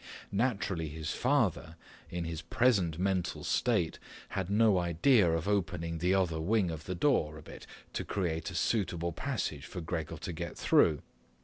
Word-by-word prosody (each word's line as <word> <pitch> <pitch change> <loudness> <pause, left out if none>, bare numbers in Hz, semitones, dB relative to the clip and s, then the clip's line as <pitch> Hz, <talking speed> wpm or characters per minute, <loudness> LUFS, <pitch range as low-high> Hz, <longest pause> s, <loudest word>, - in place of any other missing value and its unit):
Naturally 100 -7 0
his 80 +1 -4
father, 105 - +1 0.3
in 85 0 -3
his 80 -1 -4
present 110 -10 +2
mental 95 -1 -1
state, - - +1 0.3
had 95 -2 -3
no 105 -2 +4
idea 90 - +4
of 80 +2 -1
opening 90 -5 -1
the 90 +3 +2
other 85 -4 +1
wing 95 0 +2
of 80 -1 -7
the 90 - -3
door 80 - +1
a - - -11
bit - - -11 0.3
to - - -2
create 85 -4 -2
a 90 - -8
suitable 85 -3 0
passage 85 - -3
for 90 - -6
Gregor 80 -2 -4
to 90 - -5
get 85 +1 -5
through. 75 -3 +3
90 Hz, 165 wpm, -31 LUFS, 80-100 Hz, 0.3 s, no